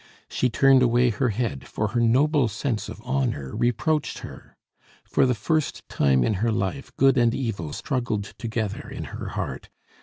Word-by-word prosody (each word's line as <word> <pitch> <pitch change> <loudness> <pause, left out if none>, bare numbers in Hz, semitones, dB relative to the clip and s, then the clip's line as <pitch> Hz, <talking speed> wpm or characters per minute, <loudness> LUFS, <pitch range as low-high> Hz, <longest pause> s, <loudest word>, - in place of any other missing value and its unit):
She 125 - 0
turned 135 +2 +5
away 120 0 +4
her 120 +4 0
head, 110 - -3
for 105 -1 -2
her 120 - -1
noble 135 +4 +3
sense 110 +2 -3
of - - -8
honor 125 - -1
reproached 150 +6 0
her. - - -12 0.5
For 135 - +2
the 125 - +1
first 155 - -1
time 65 -3 +3
in 110 - +1
her 115 0 +2
life 110 +6 -2
good 135 -1 +5
and 120 -1 +3
evil 100 - -3
struggled 120 - -2
together 110 -3 -3
in - - -6
her - - -5
heart. - - -4
120 Hz, 170 wpm, -25 LUFS, 105-135 Hz, 0.5 s, turned